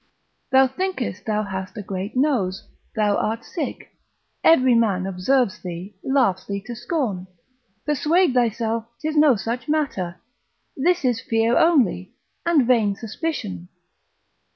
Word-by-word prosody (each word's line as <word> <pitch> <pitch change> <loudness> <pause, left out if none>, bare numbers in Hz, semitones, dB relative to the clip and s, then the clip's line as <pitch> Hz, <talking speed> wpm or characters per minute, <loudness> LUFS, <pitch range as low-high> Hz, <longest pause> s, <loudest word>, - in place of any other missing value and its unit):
Thou 265 0 +6
thinkest 265 - -3
thou 215 -1 0
hast 190 +1 -6
a 210 - -5
great 195 +4 -5
nose, 235 -10 0 0.3
thou 210 -2 +2
art 225 +2 -2
sick, 305 -7 -5 0.5
every 260 -6 +5
man 205 -6 +2
observes 195 +4 0
thee, 180 +3 -7
laughs 245 -9 +2
thee 200 0 -2
to 240 - -6
scorn; 240 - -2 0.6
persuade 300 +2 +2
thyself 230 -2 0
'tis 310 0 -3
no 295 -4 +6
such 235 +6 -4
matter: 260 - -1 0.6
this 345 +2 +1
is 240 -3 +1
fear 225 +1 +1
only, 255 - +2 0.3
and 310 -7 +4
vain 225 -5 +3
suspicion. 220 - -5
230 Hz, 130 wpm, -22 LUFS, 195-275 Hz, 0.6 s, Thou